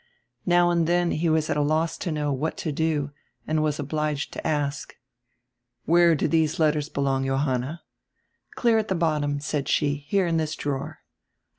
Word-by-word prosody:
Now 175 0 +4
and 170 -2 +1
then 175 0 +2
he 165 +2 0
was 155 -1 +2
at - - 0
a - - +2
loss 155 +3 +1
to 175 - -3
know 150 -2 -1
what 145 +4 -2
to 155 - -3
do 150 -1 -1 0.3
and 155 0 0
was 150 -1 0
obliged 150 0 -2
to - - -4
ask 145 -1 -2 0.9
"Where 170 0 +5
do - - 0
these 160 -1 +1
letters 155 -1 +1
belong, 135 -2 0
Johanna?" 135 +3 -1 0.7
"Clear 230 -2 +3
at 215 - -2
tire 190 - -1
bottom," 150 -3 0
said 145 -1 -3
she, 145 -2 +1
"here 195 +3 +2
in 165 -1 +1
this 155 -1 -1
drawer." 140 -2 -4
155 Hz, 175 wpm, -25 LUFS, 145-165 Hz, 0.9 s, Where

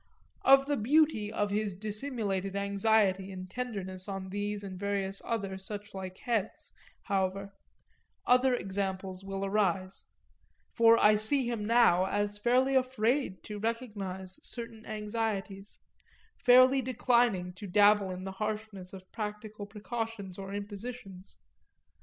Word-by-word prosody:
Of 270 0 +6
the 290 0 0
beauty 245 -3 +2
of 205 -2 -1
his 205 -2 -1
dissimulated 205 -2 -2
anxiety 200 -1 +2
and 185 -1 -7
tenderness 190 -4 -5
on 195 -1 -5
these 205 +1 -3
and 190 -2 -7
various 200 -1 -1
other 195 -4 -3
suchlike 190 -2 -7
heads, 225 -5 -3 0.3
however, 195 0 -1 0.7
other 250 +1 +4
examples 190 -2 -3
will 195 0 -4
arise; 195 -2 -1 0.7
for 230 0 +6
I 210 -1 +5
see 245 +4 +2
him 235 -3 -2
now 210 -6 +4
as 205 +1 -1
fairly 255 +4 +3
afraid 255 -4 +1
to 210 -1 -7
recognise 200 -5 -4
certain 230 -2 -9
anxieties, 210 -2 -4 0.6
fairly 255 +1 +6
declining 235 -7 +1
to 200 +3 -9
dabble 205 +1 +4
in 185 0 -6
the 190 - -5
harshness 210 -2 -5
of 185 -1 -11
practical 210 -1 -6
precautions 210 -2 -5
or 195 0 -6
impositions. 205 -1 -7
205 Hz, 125 wpm, -30 LUFS, 195-230 Hz, 0.7 s, Of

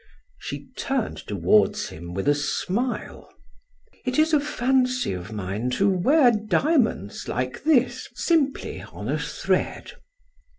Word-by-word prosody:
She - - -6
turned 265 -4 -2
toward 100 +1 +3
him 85 +2 -6
with 95 - -2
a 145 - +6
smile: 195 - -2 0.7
"It 255 0 -1
is 315 +1 +3
a 300 - +6
fancy 255 - +1
of 90 +3 -7
mine 105 +3 -3
to 200 - +3
wear 250 - +4
diamonds 215 - 0
like 125 - -3
this, 265 -5 +2
simply 300 -5 0
on - - -8
a - - 0
thread." - - -2
220 Hz, 125 wpm, -24 LUFS, -, 0.7 s, a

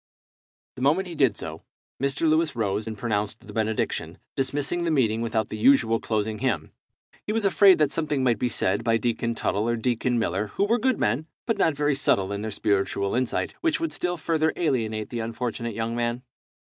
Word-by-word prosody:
The - - -7
moment 160 +8 +2
he 175 - -7
did 135 -9 +2
so, 80 0 -6 0.4
Mr. 140 +4 +1
Lewis 155 -1 +2
rose 105 -1 -1
and 110 -1 -5
pronounced 105 -1 -2
the - - -10
benediction, 110 -1 -1 0.2
dismissing 145 +6 -1
the 170 - 0
meeting 115 -7 +2
without 110 -1 -1
the 110 - -5
usual 115 -2 +4
closing 110 -1 -2
hymn. 105 - -1 0.6
He - - 0
was 220 -1 +1
afraid 195 0 +6
that 150 -2 +2
something 150 -4 -1
might 120 -4 +2
be 125 - +1
said 100 -1 0
by 115 0 +3
Deacon 115 0 -1
Tuttle 110 +1 0
or 120 - +1
Deacon 120 +1 0
Miller, 105 -1 0
who 195 - 0
were 230 +3 +2
good 260 +1 +1
men, 150 +7 0 0.2
but 230 -4 -1
not 160 -5 +3
very 145 0 +1
subtile 100 -8 +1
in 100 0 -3
their 110 - -3
spiritual 100 -1 0
insight, 125 0 -1
which 325 -2 +1
would 330 0 -2
still 175 0 -1
further 160 -1 +1
alienate 110 -9 -1
the 120 - -3
unfortunate 115 0 -3
young 115 +1 -2
man. 120 +1 -1
120 Hz, 200 wpm, -25 LUFS, 110-155 Hz, 0.6 s, afraid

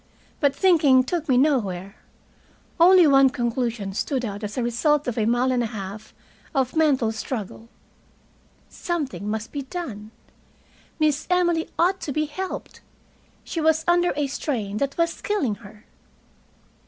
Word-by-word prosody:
But 285 -2 +2
thinking 305 -9 +4
took 315 +3 -3
me 255 - +4
nowhere. 200 -9 0 0.8
Only 360 +1 +7
one 270 -2 +6
conclusion 235 -5 -2
stood 255 +4 -2
out 205 0 -6
as 210 +2 -5
a 250 - 0
result 290 +5 +1
of 245 - -1
a 220 -2 0
mile 245 +2 +2
and 250 -1 +1
a 235 - -1
half 210 0 -8 0.4
of 265 0 0
mental 280 -8 +2
struggle. 225 0 -6 1.0
Something 295 - -4
must 220 0 -4
be 285 - -4
done. 260 - -7 0.9
Miss 305 -2 +1
Emily 345 -2 +1
ought 370 +3 +2
to 290 - -4
be 305 +2 0
helped. 375 +6 -6 0.6
She 330 - -4
was 320 0 +2
under 350 0 +3
a 290 0 0
strain 235 -7 -3
that 275 +3 -2
was 335 0 0
killing 315 - 0
her. 210 +1 -15
265 Hz, 145 wpm, -23 LUFS, 225-315 Hz, 1.0 s, Only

